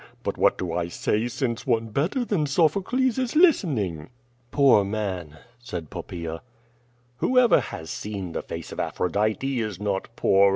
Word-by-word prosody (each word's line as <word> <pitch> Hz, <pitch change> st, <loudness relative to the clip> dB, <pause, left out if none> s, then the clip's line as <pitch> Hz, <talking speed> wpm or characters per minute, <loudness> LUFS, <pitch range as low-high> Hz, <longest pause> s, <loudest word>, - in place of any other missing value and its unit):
But -, -, -2 dB
what -, -, +3 dB
do 90 Hz, -3 st, -3 dB
I 85 Hz, 0 st, -1 dB
say! 105 Hz, +6 st, 0 dB
since 120 Hz, 0 st, -3 dB
one 115 Hz, -2 st, +1 dB
better 170 Hz, -, 0 dB
than 170 Hz, -10 st, 0 dB
Sophocles 200 Hz, -, +2 dB
is 255 Hz, +2 st, -2 dB
listening." 135 Hz, -, +3 dB, 0.4 s
"Poor 135 Hz, -8 st, +5 dB
man," 95 Hz, -7 st, -3 dB, 0.2 s
said 90 Hz, -10 st, -7 dB
Poppaea. 85 Hz, -2 st, -6 dB, 0.8 s
"Whoever 250 Hz, -, +4 dB
has 80 Hz, -, -6 dB
seen 100 Hz, -4 st, -5 dB
the -, -, -3 dB
face -, -, -7 dB
of -, -, -7 dB
Aphrodite 110 Hz, +8 st, 0 dB
is 105 Hz, -5 st, -3 dB
not 100 Hz, -2 st, -1 dB
poor. 100 Hz, -2 st, +5 dB
110 Hz, 150 wpm, -25 LUFS, 95-150 Hz, 0.8 s, Poor